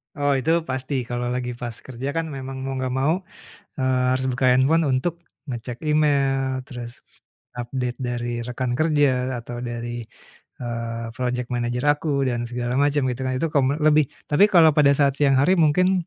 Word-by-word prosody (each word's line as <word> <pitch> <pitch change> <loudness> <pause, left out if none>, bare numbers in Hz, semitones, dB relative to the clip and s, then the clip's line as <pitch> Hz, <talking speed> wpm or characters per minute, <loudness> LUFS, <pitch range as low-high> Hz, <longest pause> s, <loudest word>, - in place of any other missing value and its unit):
Oh 145 -1 +1
itu 145 +5 0 0.2
pasti, 130 +2 -3 0.2
kalau 120 0 -2
lagi 125 -1 -2
pas 120 -2 -5
kerja 130 +1 -5
kan 165 0 0
memang 135 -1 -6
mau 135 0 -3
enggak 130 -1 -2
mau, 135 +4 +2 0.7
eee, 130 -1 +1
harus 130 0 0
buka 125 +1 -1
handphone 140 +6 +3
untuk 135 +6 0 0.3
ngecek 120 -1 -6
email, 135 -3 +2
terus 120 -2 -8 0.5
update 125 0 -4
dari 120 -1 -3
rekan 125 +1 -3
kerja, 140 -5 +2
atau 120 +1 -7
dari, 120 -1 -5 0.6
eee, 115 -1 -4
projek 125 -1 -2
manajer 120 +1 -1
aku 145 -1 +1
dan 120 -1 -2
segala 120 0 -3
macem 145 -1 +2
gitu 125 +1 -5
kan, 130 - -1
itu 165 - 0
kome 140 0 +2
lebih. 155 -1 +5 0.2
Tapi 150 +7 +6
kalau 170 -5 +6
pada 145 -1 +5
saat 140 -1 +3
siang 140 -2 +4
hari 180 +7 +4
mungkin 180 +3 +3
130 Hz, 170 wpm, -23 LUFS, 120-145 Hz, 0.7 s, Tapi